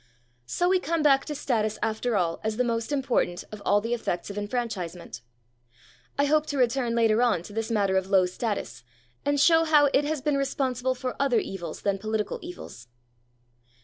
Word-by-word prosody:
So 350 Hz, -, 0 dB
we 370 Hz, 0 st, +3 dB
come 335 Hz, -3 st, -1 dB
back 275 Hz, -2 st, +4 dB
to 300 Hz, -, -4 dB
status 220 Hz, -6 st, -1 dB
after 220 Hz, +1 st, 0 dB
all 170 Hz, -3 st, -1 dB
as 220 Hz, 0 st, -2 dB
the 250 Hz, -, +2 dB
most 230 Hz, +1 st, -2 dB
important 255 Hz, -10 st, 0 dB
of 210 Hz, -1 st, -8 dB
all 205 Hz, 0 st, +3 dB
the 230 Hz, +3 st, -2 dB
effects 200 Hz, -5 st, -3 dB
of -, -, -8 dB
enfranchisement. 190 Hz, -, -4 dB, 1.0 s
I 285 Hz, -, +3 dB
hope 305 Hz, +1 st, +2 dB
to 285 Hz, -, -3 dB
return 245 Hz, -1 st, +1 dB
later 225 Hz, -1 st, +3 dB
on 220 Hz, -9 st, +2 dB
to 205 Hz, -, -11 dB
this 225 Hz, +1 st, -2 dB
matter 200 Hz, -4 st, +2 dB
of 190 Hz, 0 st, -1 dB
low 190 Hz, -2 st, +5 dB
status, 200 Hz, -, -4 dB, 0.4 s
and 285 Hz, 0 st, +2 dB
show 325 Hz, +2 st, +5 dB
how 300 Hz, -3 st, +4 dB
it 280 Hz, -, +4 dB
has 305 Hz, 0 st, -1 dB
been 290 Hz, +1 st, 0 dB
responsible 260 Hz, -2 st, -1 dB
for 255 Hz, 0 st, -4 dB
other 275 Hz, -4 st, +2 dB
evils 175 Hz, -7 st, -4 dB
than 200 Hz, -1 st, 0 dB
political 215 Hz, 0 st, -2 dB
evils. 335 Hz, -, -10 dB
235 Hz, 185 wpm, -26 LUFS, 205-275 Hz, 1.0 s, low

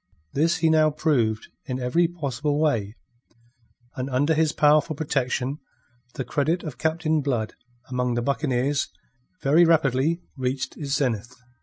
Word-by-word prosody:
This 165 Hz, +5 st, +2 dB
he 160 Hz, -1 st, +2 dB
now 155 Hz, -1 st, +5 dB
proved 125 Hz, -8 st, 0 dB, 0.2 s
in 130 Hz, 0 st, -3 dB
every 150 Hz, +8 st, +2 dB
possible 145 Hz, -3 st, -2 dB
way, 115 Hz, -9 st, 0 dB, 1.0 s
and 130 Hz, -1 st, -3 dB
under 145 Hz, +5 st, +2 dB
his 155 Hz, -1 st, +2 dB
powerful 150 Hz, +1 st, +3 dB
protection 135 Hz, -2 st, -1 dB, 0.6 s
the 130 Hz, -, -3 dB
credit 160 Hz, +5 st, 0 dB
of 140 Hz, -6 st, -7 dB
Captain 160 Hz, -1 st, +1 dB
Blood 120 Hz, -6 st, -1 dB, 0.3 s
among 125 Hz, -1 st, -1 dB
the 120 Hz, -, -1 dB
buccaneers 140 Hz, 0 st, 0 dB, 0.6 s
very 150 Hz, +5 st, +5 dB
rapidly 160 Hz, 0 st, +2 dB
reached 130 Hz, 0 st, -2 dB
its 140 Hz, -3 st, -4 dB
zenith. 125 Hz, -3 st, -1 dB
140 Hz, 135 wpm, -24 LUFS, 125-155 Hz, 1.0 s, now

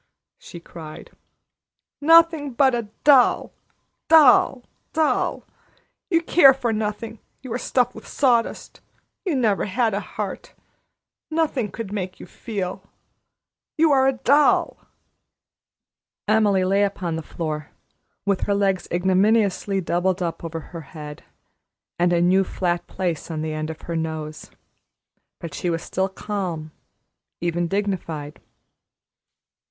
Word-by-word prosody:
she 170 Hz, -, -11 dB
cried. 160 Hz, -2 st, -11 dB, 0.9 s
"Nothing 325 Hz, -2 st, +5 dB
but 265 Hz, +1 st, +3 dB
a 235 Hz, -3 st, -2 dB
doll 270 Hz, -4 st, +4 dB, 0.5 s
doll 275 Hz, -4 st, +6 dB, 0.3 s
doll! 315 Hz, -1 st, 0 dB, 0.7 s
You 335 Hz, -2 st, +2 dB
care 275 Hz, -6 st, +6 dB
for 240 Hz, -4 st, -1 dB
nothing. 215 Hz, +1 st, -4 dB, 0.2 s
You 255 Hz, -4 st, -5 dB
are 245 Hz, -, -2 dB
stuffed 250 Hz, -1 st, 0 dB
with -, -, -12 dB
sawdust. 245 Hz, -5 st, 0 dB, 0.4 s
You 350 Hz, -6 st, 0 dB
never 220 Hz, -6 st, +1 dB
had 225 Hz, +2 st, 0 dB
a 200 Hz, -, 0 dB
heart. -, -, -6 dB, 0.7 s
Nothing 310 Hz, -8 st, 0 dB
could 215 Hz, +1 st, -6 dB
ever -, -, -8 dB
make 185 Hz, -3 st, -4 dB
you -, -, -9 dB
feel. 190 Hz, -1 st, -5 dB, 1.0 s
You 320 Hz, 0 st, +4 dB
are 265 Hz, -1 st, +4 dB
a 270 Hz, -, +3 dB
doll!" 280 Hz, +4 st, +3 dB, 1.5 s
Emily 205 Hz, -3 st, +3 dB
lay 195 Hz, +2 st, +2 dB
upon 185 Hz, -4 st, -2 dB
the 160 Hz, -, -3 dB
floor, 155 Hz, -2 st, -5 dB, 0.6 s
with 200 Hz, -2 st, +1 dB
her 200 Hz, -, +2 dB
legs 195 Hz, -2 st, 0 dB
ignominiously 195 Hz, +2 st, +2 dB
doubled 180 Hz, +2 st, 0 dB
up 170 Hz, -2 st, -3 dB
over 165 Hz, -1 st, -5 dB
her 165 Hz, -, -6 dB
head, 150 Hz, 0 st, -10 dB, 0.8 s
and 175 Hz, 0 st, +3 dB
a 175 Hz, -, +3 dB
new 185 Hz, +2 st, +4 dB
flat 175 Hz, -2 st, -2 dB
place 175 Hz, -4 st, -3 dB
on 155 Hz, -2 st, -3 dB
the 155 Hz, -1 st, -3 dB
end 155 Hz, 0 st, -4 dB
of 160 Hz, -, -8 dB
her 170 Hz, -, -4 dB
nose; 160 Hz, -1 st, -5 dB, 0.9 s
but 165 Hz, -3 st, -7 dB
she 175 Hz, -, -2 dB
was 165 Hz, -1 st, -2 dB
still 190 Hz, +1 st, -1 dB
calm, 185 Hz, -6 st, -4 dB, 0.7 s
even 175 Hz, 0 st, -1 dB
dignified. 165 Hz, -6 st, -3 dB
195 Hz, 130 wpm, -23 LUFS, 170-240 Hz, 1.5 s, doll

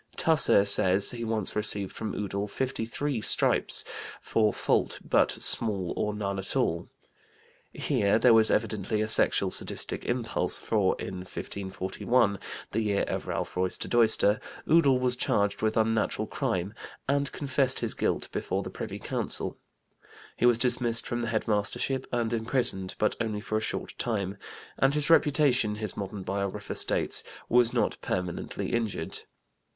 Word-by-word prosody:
Tusser 155 Hz, -10 st, +5 dB
says 100 Hz, -1 st, +5 dB
he 120 Hz, -1 st, -6 dB
once 110 Hz, -3 st, -1 dB
received 105 Hz, -2 st, 0 dB
from 110 Hz, -2 st, -4 dB
Udall 100 Hz, 0 st, -3 dB
53 130 Hz, +2 st, -3 dB
stripes -, -, +1 dB, 0.3 s
for 110 Hz, -2 st, +1 dB
"fault -, -, 0 dB
but -, -, +3 dB
small 100 Hz, -6 st, 0 dB
or 105 Hz, -, -1 dB
none 100 Hz, -2 st, -3 dB
at 95 Hz, -, -4 dB
all." -, -, 0 dB, 0.8 s
Here 100 Hz, +1 st, +1 dB
there 120 Hz, +1 st, +5 dB
was 110 Hz, -1 st, +5 dB
evidently 110 Hz, -1 st, -1 dB
a 110 Hz, -, 0 dB
sexual 110 Hz, -, +6 dB
sadistic -, -, -2 dB
impulse, -, -, 0 dB
for -, -, 0 dB
in 95 Hz, -, -5 dB
1541 95 Hz, +3 st, -2 dB, 0.3 s
(the 115 Hz, -, -1 dB
year 105 Hz, -2 st, 0 dB
of -, -, -4 dB
Ralph -, -, -4 dB
Roister 90 Hz, 0 st, -2 dB
Doister) 110 Hz, -3 st, +3 dB, 0.3 s
Udall 150 Hz, -5 st, +4 dB
was 125 Hz, -1 st, +1 dB
charged 100 Hz, -4 st, 0 dB
with 110 Hz, 0 st, 0 dB
unnatural 110 Hz, 0 st, +1 dB
crime 90 Hz, +3 st, -2 dB, 0.3 s
and 140 Hz, 0 st, 0 dB
confessed 135 Hz, -2 st, 0 dB
his -, -, -2 dB
guilt -, -, -1 dB
before -, -, -2 dB
the -, -, -7 dB
Privy -, -, -6 dB
Council. -, -, -3 dB, 0.8 s
He 120 Hz, -, +2 dB
was 120 Hz, -2 st, +5 dB
dismissed 120 Hz, -1 st, +2 dB
from 120 Hz, -, -3 dB
the 115 Hz, -, -2 dB
head 110 Hz, 0 st, -2 dB
mastership 110 Hz, +5 st, -1 dB
and 120 Hz, -1 st, -1 dB
imprisoned, 110 Hz, -5 st, +1 dB
but 105 Hz, -, +1 dB
only 110 Hz, -2 st, -2 dB
for 110 Hz, +1 st, -4 dB
a 110 Hz, -, +1 dB
short -, -, -4 dB
time, 100 Hz, -4 st, -2 dB, 0.4 s
"and 135 Hz, +2 st, +3 dB
his 150 Hz, +2 st, +1 dB
reputation," 140 Hz, -9 st, +3 dB
his 105 Hz, -2 st, -3 dB
modern 100 Hz, -1 st, -6 dB
biographer 100 Hz, 0 st, -4 dB
states, -, -, 0 dB, 0.2 s
"was 120 Hz, -1 st, +3 dB
not -, -, 0 dB
permanently 90 Hz, -2 st, -4 dB
injured." 115 Hz, -3 st, -2 dB
110 Hz, 150 wpm, -28 LUFS, 100-120 Hz, 0.8 s, sexual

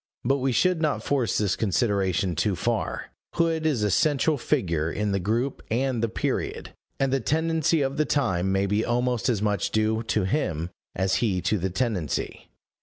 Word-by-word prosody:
But 135 Hz, +3 st, +3 dB
we 135 Hz, 0 st, 0 dB
should 180 Hz, +7 st, +2 dB
not 155 Hz, -2 st, 0 dB
force 135 Hz, -5 st, 0 dB
this 105 Hz, -3 st, +1 dB
consideration 95 Hz, -3 st, 0 dB
too 100 Hz, +4 st, +1 dB
far: -, -, -2 dB, 0.2 s
Hood 165 Hz, -2 st, +1 dB
is 130 Hz, -9 st, +1 dB
a 105 Hz, -, +1 dB
central 150 Hz, -, +2 dB
figure 85 Hz, -, 0 dB
in 105 Hz, +2 st, -1 dB
the 100 Hz, -, +1 dB
group 115 Hz, +8 st, -1 dB
and 125 Hz, +1 st, 0 dB
the 115 Hz, -, +1 dB
period, -, -, -3 dB, 0.3 s
and 135 Hz, -1 st, +1 dB
the 135 Hz, -, +2 dB
tendency 160 Hz, +2 st, +1 dB
of 135 Hz, +2 st, -2 dB
the 155 Hz, -, +2 dB
time 95 Hz, -11 st, +1 dB
may 95 Hz, +1 st, +2 dB
be 105 Hz, +3 st, +1 dB
almost 125 Hz, 0 st, 0 dB
as 110 Hz, -4 st, 0 dB
much 105 Hz, -3 st, 0 dB
due 110 Hz, +1 st, +1 dB
to 110 Hz, -2 st, 0 dB
him 90 Hz, -, -1 dB, 0.2 s
as 95 Hz, 0 st, +1 dB
he 100 Hz, -6 st, +1 dB
to 105 Hz, -, +1 dB
the 95 Hz, +2 st, -1 dB
tendency. 95 Hz, -, -2 dB
110 Hz, 180 wpm, -25 LUFS, 95-135 Hz, 0.3 s, But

